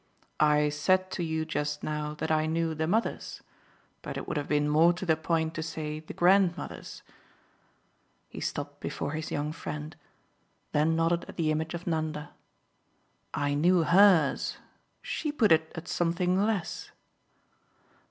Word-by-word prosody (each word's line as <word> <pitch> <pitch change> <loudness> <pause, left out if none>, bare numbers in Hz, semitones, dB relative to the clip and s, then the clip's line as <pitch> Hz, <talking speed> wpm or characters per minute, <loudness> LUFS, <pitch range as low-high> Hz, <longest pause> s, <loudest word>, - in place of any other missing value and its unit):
"I 150 0 +4
said 185 +6 +1
to 180 - -2
you 160 -1 -1
just 150 -1 -3
now 150 0 -3
that 150 - -3
I 155 0 +2
knew 165 0 0
the 160 0 -2
mothers, 220 +6 -1 0.6
but - - -6
it - - -6
would - - -3
have 145 -1 -2
been 150 0 +2
more 160 +4 +5
to 185 +2 -6
the 160 -3 +3
point 160 0 -1
to 165 - -4
say 155 -1 -4
the 155 - -10
grandmothers." 185 0 +1 1.2
He - - -9
stopped - - -4
before - - -4
his 155 0 -4
young 150 +1 -2
friend, 155 -1 -6 0.8
then 155 +2 +2
nodded 165 +1 +1
at - - -10
the 155 -2 +1
image 155 +2 -2
of 170 - -7
Nanda. 155 -2 -2 1.0
"I 145 0 -1
knew 170 +4 +4
HERS. 175 -3 +4 0.5
She 305 - -2
put 235 - +2
it 160 0 +4
at 165 0 -7
something 180 +3 +1
less." 205 -7 -2
160 Hz, 150 wpm, -29 LUFS, 150-175 Hz, 1.2 s, more